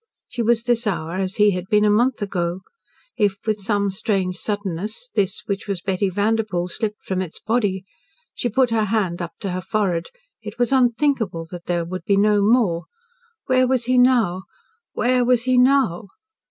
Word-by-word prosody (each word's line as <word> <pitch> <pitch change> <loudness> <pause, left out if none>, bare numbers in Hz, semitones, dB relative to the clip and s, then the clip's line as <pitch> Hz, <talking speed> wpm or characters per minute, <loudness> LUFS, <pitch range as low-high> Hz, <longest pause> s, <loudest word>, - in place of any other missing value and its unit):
She 245 - -4
was 230 0 +2
this 240 -1 +1
hour 170 -3 -2
as 190 +1 -2
he 210 -2 +4
had 180 -1 -4
been 210 0 +3
a 210 - +4
month 235 +1 +2
ago. 175 -2 -2 0.6
If, 205 -3 +2
with 215 -1 0
some 200 -1 0
strange 190 -2 -1
suddenness, 205 - -4
this 195 -2 -1
which 200 +1 -4
was 195 -4 -3
Betty 190 0 0
Vanderpoel, 205 -2 0
slipped 210 +1 -4
from 185 -1 -2
its 180 -4 -6
body 205 -4 -1 0.5
She 240 - -2
put 250 +1 +2
her 220 -2 +2
hand 195 -5 -1
up 170 - -5
to 195 - -3
her 185 +1 -3
forehead. 180 -3 -1 0.3
It - - -8
was 245 +1 +1
unthinkable 245 - +1
that 175 -1 -9
there 175 -1 0
would 185 +2 -6
be 200 -3 +2
no 205 0 +3
more. 200 -6 +2 0.6
Where 255 0 +3
was 250 -2 +1
he 255 +1 +3
now 225 -8 +3 0.5
where 250 0 +2
was 245 -1 +3
he 255 0 +2
now? 250 -8 +3
210 Hz, 180 wpm, -21 LUFS, 185-235 Hz, 0.6 s, he